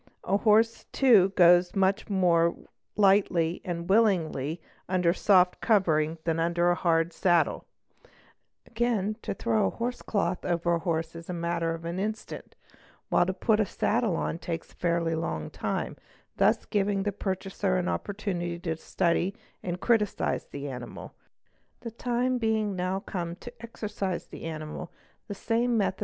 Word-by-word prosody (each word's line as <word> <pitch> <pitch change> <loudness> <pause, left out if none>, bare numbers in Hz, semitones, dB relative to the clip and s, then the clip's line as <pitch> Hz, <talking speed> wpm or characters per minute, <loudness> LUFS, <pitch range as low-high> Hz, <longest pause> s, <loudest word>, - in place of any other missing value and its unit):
A 195 - +1
horse 225 +1 +3
too 225 -8 +5
goes 175 0 +5
much 195 +2 +1
more 170 -4 +3 0.4
lightly 190 -4 +3
and 170 -1 -4
willingly 175 -8 +2 0.3
under 180 -2 +2
a - - -1
soft 185 -2 +3
covering 165 -7 +2
than 165 -1 0
under 170 +1 +2
a - - +4
hard 165 -1 +1
saddle; 175 -2 +2 1.0
again 225 -3 -1
to - - -4
throw 110 - +1
a - - +1
horse 240 - -4
cloth 185 -4 -1
over 175 -1 0
a 170 - +1
horse 165 -1 -2
is 165 0 -9
the 180 - -4
matter 170 -1 -1
of 165 0 -10
an 170 +2 -3
instant, 215 +2 -5 0.5
while 175 - +3
to 190 - 0
put 215 +1 +2
on - - +4
a 195 - -8
saddle 215 -8 0
takes 165 -1 -5
a - - -22
fairly 170 -1 0
long 120 - -3
time, - - -3 0.4
thus - - +3
giving 200 -1 0
the 205 - 0
pur 195 -1 -2
chaser 190 0 -2
an 180 0 -1
opportunity 180 -4 -3
to 165 -2 -3
study 175 +3 0 0.3
and 180 0 -4
criticise 220 -4 +1
the 145 0 -6
animal. 125 -3 -8 0.7
The 230 - -6
time 245 +2 -1
being 220 -3 0
now 185 +1 -2
come 170 -4 -4
to 245 +6 -11
exercise 210 -5 -4
the - - -10
animal 155 -1 -6 0.4
the 205 - -5
same 230 +3 0
method! 200 - 0
180 Hz, 160 wpm, -28 LUFS, 170-210 Hz, 1.0 s, too